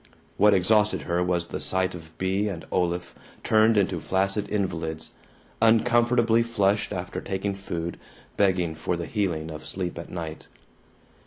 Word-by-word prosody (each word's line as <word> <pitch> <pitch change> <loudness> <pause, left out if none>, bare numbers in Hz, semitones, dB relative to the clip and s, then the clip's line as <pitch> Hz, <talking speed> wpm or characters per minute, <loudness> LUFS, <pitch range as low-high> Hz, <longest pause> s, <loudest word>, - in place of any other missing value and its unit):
What 105 +1 +6
exhausted 105 +3 +3
her 85 +1 0
was 90 -1 0
the - - -5
sight 95 0 +1
of 80 -2 -11
Bea 95 +3 0
and 85 -4 -6
Olaf 90 -1 -1 0.3
turned 110 0 +4
into 100 -2 +1
flaccid 100 +2 0
invalids, 80 -6 -3 0.5
uncomfortably 115 0 +4
flushed 105 -3 +1
after - - -4
taking 95 +1 -2
food, 85 -3 -5 0.4
begging 90 -4 +2
for 80 +2 -2
the 85 - -4
healing 85 -7 -2
of 75 0 -8
sleep 90 -2 -4
at 85 - -8
night. 80 -3 -6
95 Hz, 145 wpm, -26 LUFS, 85-105 Hz, 0.5 s, What